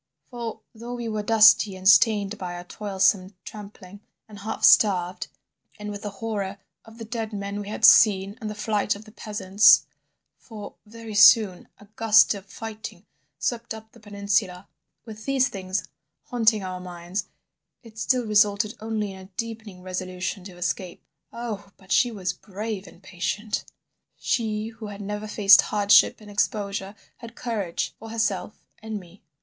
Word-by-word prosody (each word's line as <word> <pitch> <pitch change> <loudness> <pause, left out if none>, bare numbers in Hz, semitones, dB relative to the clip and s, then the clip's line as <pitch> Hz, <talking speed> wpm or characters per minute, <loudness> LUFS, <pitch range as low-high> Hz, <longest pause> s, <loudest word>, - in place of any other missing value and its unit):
For 235 -2 -6
though 235 +2 -7
we 240 -1 -5
were 215 -1 -2
dusty 215 -2 +5
and 185 0 -4
stained 205 0 +4
by 180 -1 -5
our 175 - -7
toilsome 190 0 0
tramping, 205 -2 -11 0.3
and 210 -2 -12
half 220 +2 -5
starved 185 -4 +4 0.5
and 210 0 -6
with 205 0 -7
the 205 - -4
horror 200 -1 -4 0.3
of 225 0 -16
the 225 - -7
dead 225 -1 -4
men 200 0 -5
we 205 - -8
had 215 - +1
seen 200 -3 +6
and 215 - -4
the 210 - -6
flight 210 0 0
of 205 +2 -12
the 215 - -14
peasants—for 205 +1 0
very 225 0 -9
soon 210 -3 +6
a 205 - -17
gust 220 -1 +5
of 200 -1 -10
fighting 215 -3 -8 0.3
swept 235 -2 -3
up 220 0 -13
the 235 - -18
peninsula—with 200 +1 -4
these 270 -1 +2
things 190 -1 -4 0.4
haunting 225 -4 +1
our 185 -1 -5
minds 180 +2 -6 0.6
it 220 -2 -13
still 250 +2 +1
resulted 210 0 +2
only 215 -2 -3
in 190 - -10
a 190 - -11
deepening 220 -5 -6
resolution 185 +1 -4
to 185 -3 -11
escape. 180 0 -4 0.3
Oh, 220 -4 -6
but 190 -1 -16
she 245 - +4
was 190 -5 -3
brave 205 +1 -6
and 170 +2 -17
patient! 205 +4 -3 0.5
She 220 -2 -1
who 225 -1 -9
had 205 -1 -9
never 210 +1 -5
faced 200 -2 +7
hardship 205 -1 +4
and 210 -1 -13
exposure 200 -1 -2 0.2
had 235 -1 -11
courage 205 -8 -3
for 225 - -10
herself 210 -3 -2 0.2
and 220 -1 -5
me. 180 +1 -17
210 Hz, 155 wpm, -25 LUFS, 195-220 Hz, 0.6 s, faced